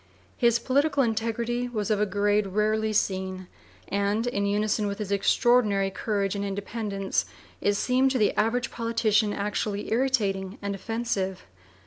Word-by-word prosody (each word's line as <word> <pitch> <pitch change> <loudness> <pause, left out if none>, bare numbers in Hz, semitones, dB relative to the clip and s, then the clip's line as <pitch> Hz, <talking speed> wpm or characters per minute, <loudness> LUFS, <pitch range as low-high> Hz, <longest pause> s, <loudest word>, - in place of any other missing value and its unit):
His 235 -1 +3
political 275 +4 +2
integrity 230 +2 -1
was 215 -2 -2
of 210 -1 +2
a 210 - +2
grade 205 +1 +1
rarely 215 +2 +1
seen; 190 -2 -1 0.4
and, 200 +3 0
in 200 -5 0
unison 210 +1 +1
with 200 0 -3
his 210 -2 -5
extraordinary 200 -1 +3
courage 200 -1 -1
and 200 - -2
independence, 200 0 -2 0.3
it 205 - +2
seemed 255 +5 +2
to 260 - 0
the 215 -3 +2
average 240 +3 0
politician 230 -2 +1
actually 205 0 -2
irritating 210 -6 0
and 200 0 -3
offensive. 195 -2 -3
210 Hz, 140 wpm, -26 LUFS, 200-230 Hz, 0.4 s, His